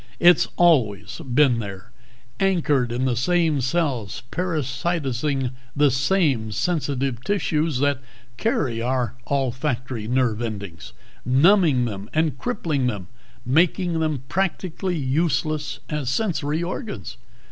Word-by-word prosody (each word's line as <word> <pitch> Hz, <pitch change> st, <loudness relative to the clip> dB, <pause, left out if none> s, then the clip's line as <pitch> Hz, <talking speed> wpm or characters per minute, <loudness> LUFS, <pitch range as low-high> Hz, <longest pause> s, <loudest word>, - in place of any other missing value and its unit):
It's 175 Hz, 0 st, +6 dB
always 110 Hz, -, +2 dB
been 125 Hz, -2 st, +4 dB
there, 100 Hz, +1 st, -7 dB, 0.5 s
anchored 160 Hz, -10 st, +2 dB
in 125 Hz, +2 st, -1 dB
the 125 Hz, -2 st, +1 dB
same 160 Hz, +2 st, +2 dB
cells, 130 Hz, -, -1 dB
parasitizing 140 Hz, -4 st, -1 dB, 0.2 s
the 145 Hz, -1 st, +4 dB
same 135 Hz, -, +1 dB
sensitive 135 Hz, -, -1 dB
tissues 160 Hz, -7 st, 0 dB
that 145 Hz, -2 st, +2 dB, 0.4 s
carry 135 Hz, -, 0 dB
our 125 Hz, -2 st, 0 dB, 0.2 s
olfactory 130 Hz, -4 st, -1 dB
nerve 120 Hz, -2 st, +1 dB
endings, 100 Hz, -7 st, -6 dB, 0.3 s
numbing 145 Hz, -, +4 dB
them 105 Hz, -2 st, -5 dB
and 160 Hz, -1 st, +2 dB
crippling 160 Hz, -, -1 dB
them, 100 Hz, -6 st, -4 dB, 0.4 s
making 170 Hz, +5 st, +2 dB
them 155 Hz, -5 st, -1 dB
practically 185 Hz, 0 st, -1 dB
useless 150 Hz, +1 st, 0 dB
as 150 Hz, -5 st, -2 dB
sensory 160 Hz, -, 0 dB
organs. 205 Hz, +5 st, -5 dB
140 Hz, 110 wpm, -23 LUFS, 125-165 Hz, 0.5 s, It's